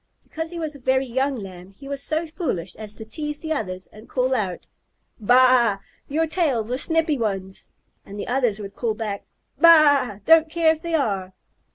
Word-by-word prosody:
Because 320 +1 -6
he 345 - -8
was 315 -2 -4
a 285 - -12
very 260 +1 +1
young 265 +3 -1
Lamb 190 -3 -10
he 275 - -12
was 280 0 -4
so 310 +3 -1
foolish 305 - -4
as 215 -1 -9
to 220 - -9
tease 295 +6 -4
the 315 -1 -2
others 185 -9 -5
and 215 +2 -15
call 255 0 0
out, 195 -8 -2 0.5
"Baa! 245 -1 +5 0.3
your 315 +3 +1
tails 290 -9 0
are 250 - 0
snippy 320 -2 +2
ones!" 195 -4 -4 0.3
Then 200 - -11
the 205 - -5
others 245 -5 0
would 200 -1 -8
call 225 -3 -2
back, 210 -2 -5 0.3
"Baa! 290 - +6
Don't 325 0 +6
care 330 0 +3
if 320 -1 -4
they 335 -1 -2
are!" 195 -10 -1
255 Hz, 190 wpm, -23 LUFS, 210-310 Hz, 0.5 s, Baa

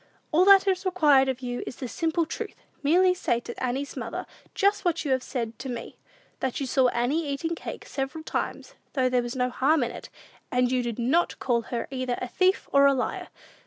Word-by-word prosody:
All 345 +4 +5
that 395 0 +7
is 375 -1 +1
required 300 -8 +4
of 260 0 -3
you 245 -1 -3
is - - -5
the 255 - -5
simple 330 +5 0
truth. - - -6 0.3
Merely 360 +5 +4
say 240 -9 0
to - - -7
Annie's 265 +3 -2
mother - - -5 0.3
just 400 0 +2
what 340 -3 0
you 280 - 0
have 260 -1 +2
said 230 -3 -4
to 265 - -5
me; 240 -2 -6 0.4
that 260 -2 -2
you 275 - -1
saw 260 0 +3
Annie 260 +7 0
eating 285 +4 -2
cake - - -7
several 275 +4 -4
times, - - -4 0.2
though 255 -3 +2
there 250 -1 +2
was 240 +1 -5
no 250 -1 0
harm 285 +3 +2
in 235 - -2
it, - - -9 0.4
and 250 0 +2
you 255 -1 +2
did 235 -2 -3
not 260 +9 +1
call 240 -3 +1
her 235 -2 -3
either 255 -2 -2
a 250 - -3
thief 370 +8 +1
or 280 0 +6
a 275 - +4
liar. 250 - -2
270 Hz, 215 wpm, -26 LUFS, 250-330 Hz, 0.4 s, that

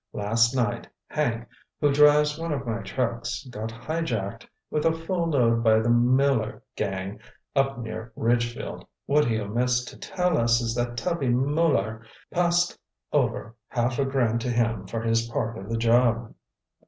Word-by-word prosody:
Last 115 +4 +2
night, 115 -5 -1 0.2
Hank, 120 -6 -1 0.3
who 145 -1 +3
drives 150 +1 +5
one 165 0 -3
of 140 -3 -2
my 115 -1 -2
trucks, 115 +3 -3
got 110 0 -4
highjacked 115 -4 -3 0.2
with 150 - 0
a 165 - +4
full 165 +1 -2
load 115 -6 +2
by 110 -1 +5
the 115 +2 +2
Muller 125 -1 +2
gang 95 0 -3 0.4
up 135 -1 +2
near 115 0 -6
Ridgefield. 120 0 -1 0.2
What 150 +1 +3
he 110 -2 +1
omits 125 +4 0
to - - -10
tell 180 -3 0
us 115 0 +3
is 115 -1 -1
that 120 0 -2
Tubby 170 -2 -1
Muller 130 -4 +1 0.3
passed 175 0 +1 0.3
over 115 +2 0
half 120 +1 -1
a 140 - +2
grand 120 -4 +1
to 125 - -2
him 115 -4 0
for 115 +3 -3
his 115 0 +1
part 115 -1 -2
of 95 +1 -8
the 115 - -1
job." 115 0 +2
120 Hz, 160 wpm, -26 LUFS, 115-140 Hz, 0.4 s, drives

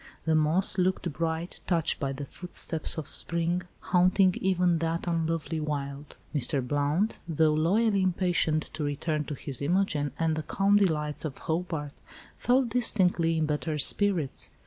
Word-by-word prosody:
The 160 - +2
moss 160 +5 +2
looked 180 -3 0
bright 165 +2 -3
"touched 165 -3 +1
by 140 -2 -1
the 140 +1 -5
footsteps 170 -1 -1
of 160 - -5
spring," 170 +1 -1 0.2
haunting 185 +1 +3
even 180 -3 +2
that 165 +1 -1
unlovely 165 -1 -1
wild. 145 -1 -4 0.2
Mr. 135 -2 +1
Blount, 145 - 0
though 160 -1 +2
loyally 195 +6 +2
impatient 175 -4 +1
to 155 -1 -3
return 150 +1 -1
to 145 - -5
his 135 -1 -5
Imogen 150 -3 +1
and 165 -1 +1
the 155 - -2
calm 195 +6 +2
delights 155 -7 +1
of 150 -4 -5
Hobart, 160 -3 -3 0.4
felt 250 0 +2
distinctly 180 -8 +2
in 160 - +1
better 150 +1 -2
spirits. 170 -1 0
165 Hz, 145 wpm, -28 LUFS, 150-180 Hz, 0.4 s, haunting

